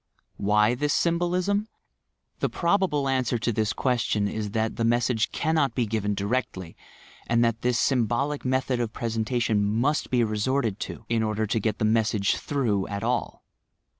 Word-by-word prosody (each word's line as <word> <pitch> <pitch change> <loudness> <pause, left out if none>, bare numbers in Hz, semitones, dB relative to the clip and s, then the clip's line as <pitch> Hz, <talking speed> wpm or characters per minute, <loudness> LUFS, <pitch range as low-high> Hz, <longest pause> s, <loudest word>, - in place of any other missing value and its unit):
Why 105 +3 +3
this 145 +4 0
symbolism? 180 +5 +1 0.7
The - - 0
probable 170 -6 +1
answer 130 -2 +1
to 120 +1 -1
this 110 0 0
question 120 -5 0
is, 105 0 -3
that 110 +1 -1
the 115 - -2
message 115 -1 +1
cannot 155 -4 0
be 125 - +1
given 105 -1 -1
directly, 100 -5 -3 0.5
and 115 0 +3
that 115 -1 -1
this 125 -1 +1
symbolic 135 +3 0
method 130 -1 0
of 115 -2 -2
presentation 115 -1 0
must 120 +9 0
be 125 -2 +2
resorted 110 0 0
to, - - -9
in 115 -1 +1
order 110 0 0
to 110 +2 0
get 110 0 -1
the 110 - 0
message 110 -2 +2
"through" 115 -9 -1
at 100 0 -4
all. 120 0 -2
115 Hz, 160 wpm, -26 LUFS, 110-130 Hz, 0.7 s, Why